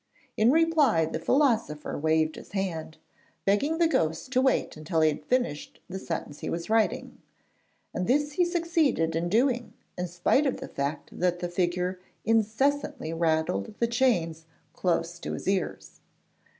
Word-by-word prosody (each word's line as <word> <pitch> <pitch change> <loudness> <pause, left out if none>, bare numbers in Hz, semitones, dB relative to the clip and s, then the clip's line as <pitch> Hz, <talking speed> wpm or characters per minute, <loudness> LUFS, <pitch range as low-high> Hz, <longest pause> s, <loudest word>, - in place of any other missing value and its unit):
In 220 +2 +4
reply 300 - +4
the 160 - -4
philosopher 225 - +1
waved 155 +1 +1
his - - -12
hand, 170 -5 -3 0.5
begging 275 +12 +2
the 335 -1 +4
ghost 160 - 0
to 255 -1 +3
wait 265 0 +1
until 160 +1 -1
he 155 - +5
had 150 0 -4
finished 245 - -1
the 190 +1 -5
sentence 165 -5 -5
he - - -4
was 170 +5 -4
writing, 225 -1 0 0.7
and 180 - -2
this 290 +3 +2
he 355 +5 +2
succeeded 330 - +1
in 170 +1 0
doing 240 +3 +1 0.2
in 180 0 -3
spite 180 - +2
of 265 - -1
the - - -6
fact 140 +2 -4
that 180 -1 +2
the 175 0 -4
figure 180 +1 -1 0.3
incessantly 225 - +1
rattled 160 - 0
the 235 - +2
chains 185 -10 +1 0.3
close 175 -1 -1
to - - -5
his - - -6
ears. 190 -2 -2
185 Hz, 155 wpm, -27 LUFS, 165-255 Hz, 0.7 s, he